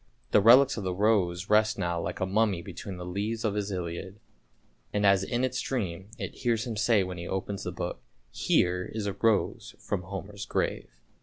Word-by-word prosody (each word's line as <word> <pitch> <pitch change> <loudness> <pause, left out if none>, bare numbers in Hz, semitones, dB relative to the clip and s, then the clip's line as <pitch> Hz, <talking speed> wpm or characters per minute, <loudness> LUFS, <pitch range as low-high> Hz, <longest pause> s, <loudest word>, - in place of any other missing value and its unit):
The 105 - +6
relics 130 +5 +7
of 105 - -3
the 90 -1 -2
rose 95 -3 +2
rest 110 0 +3
now 85 -3 -1
like 90 - -4
a 95 - +1
mummy 100 -2 +1
between 95 -1 -7
the 90 - -6
leaves 105 +5 -2
of 105 - +1
his 105 0 -2
Iliad, 90 +2 -5 0.7
and 105 0 +1
as 100 -1 +5
in 120 +5 -1
its 130 - 0
dream 95 -7 -3
it - - -6
hears 115 -2 +1
him 120 -3 -4
say 105 -1 +3
when 90 -1 -6
he 85 - -6
opens 95 +1 -3
the - - -2
book, - - -5 0.2
" - - -39 0.2
here 90 +1 +3
is 110 -2 -3
a 100 - -1
rose 105 +1 0
from 100 - -3
Homer's 95 +2 -7
grave! - - -1
100 Hz, 205 wpm, -28 LUFS, 90-110 Hz, 0.7 s, relics